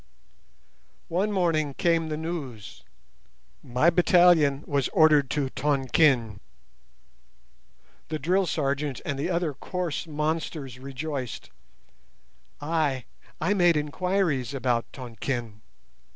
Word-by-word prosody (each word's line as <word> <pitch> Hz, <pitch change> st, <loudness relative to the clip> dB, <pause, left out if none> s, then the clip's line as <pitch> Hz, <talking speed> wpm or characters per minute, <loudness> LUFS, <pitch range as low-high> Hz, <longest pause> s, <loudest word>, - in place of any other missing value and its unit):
"One 190 Hz, +5 st, 0 dB
morning 160 Hz, -7 st, 0 dB
came 165 Hz, -2 st, +1 dB
the 155 Hz, -, -3 dB
news; 130 Hz, -, -6 dB, 0.8 s
my 130 Hz, +8 st, +2 dB
battalion 170 Hz, -5 st, +4 dB
was 140 Hz, -3 st, 0 dB
ordered 150 Hz, -4 st, +4 dB
to 140 Hz, -3 st, -1 dB
Tonquin. 130 Hz, -5 st, +2 dB, 1.7 s
The 155 Hz, -, -3 dB
drill 180 Hz, +6 st, +1 dB
sergeant 140 Hz, -3 st, -1 dB
and 140 Hz, -1 st, -3 dB
the 145 Hz, -, -1 dB
other 170 Hz, -4 st, 0 dB
coarse 175 Hz, +3 st, -4 dB
monsters 150 Hz, -4 st, -3 dB
rejoiced. 135 Hz, -1 st, -5 dB, 1.1 s
I—I 155 Hz, -, -2 dB
made 175 Hz, -5 st, +4 dB
enquiries 150 Hz, -, -1 dB
about 125 Hz, -3 st, -1 dB
Tonquin. 120 Hz, -3 st, -5 dB
150 Hz, 95 wpm, -26 LUFS, 130-165 Hz, 1.7 s, battalion